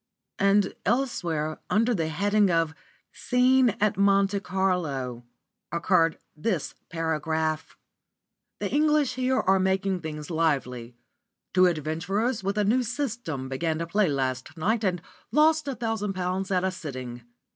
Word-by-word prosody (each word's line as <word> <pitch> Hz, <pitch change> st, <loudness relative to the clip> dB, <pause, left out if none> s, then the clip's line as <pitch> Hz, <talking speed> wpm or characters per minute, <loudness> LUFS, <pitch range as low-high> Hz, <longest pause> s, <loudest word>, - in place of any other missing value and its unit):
And 200 Hz, 0 st, +3 dB
elsewhere, 175 Hz, -, -1 dB
under 230 Hz, +3 st, +3 dB
the 165 Hz, -7 st, 0 dB
heading 200 Hz, +5 st, +2 dB
of 165 Hz, -2 st, +1 dB, 0.4 s
"Scene 250 Hz, -1 st, +3 dB
at 210 Hz, -2 st, +1 dB
Monte 200 Hz, 0 st, +3 dB
Carlo," 160 Hz, -11 st, -1 dB, 0.5 s
occurred 165 Hz, -1 st, +2 dB, 0.2 s
this 160 Hz, 0 st, -2 dB, 0.2 s
paragraph: 160 Hz, -1 st, -2 dB, 0.8 s
"The -, -, -3 dB
English 300 Hz, -2 st, +3 dB
here 255 Hz, +1 st, +1 dB
are 190 Hz, 0 st, +3 dB
making 190 Hz, 0 st, +1 dB
things 150 Hz, -1 st, -6 dB
lively. 125 Hz, -7 st, -1 dB, 0.6 s
Two 185 Hz, 0 st, +6 dB
adventurers 180 Hz, -, -1 dB
with 200 Hz, +2 st, -1 dB
a 210 Hz, -, +3 dB
new 240 Hz, +6 st, +3 dB
'system' 235 Hz, -, -3 dB
began 155 Hz, +4 st, -1 dB
to 165 Hz, -, -2 dB
play 195 Hz, +4 st, +2 dB
last 130 Hz, 0 st, -2 dB
night 220 Hz, +7 st, 0 dB
and 180 Hz, -3 st, 0 dB, 0.3 s
lost 310 Hz, 0 st, +4 dB
a 275 Hz, -, -2 dB
thousand 225 Hz, -4 st, -2 dB
pounds 185 Hz, +1 st, -2 dB
at 185 Hz, -2 st, +1 dB
a 190 Hz, -, +1 dB
sitting. 130 Hz, -8 st, -7 dB
185 Hz, 135 wpm, -26 LUFS, 160-215 Hz, 0.8 s, Two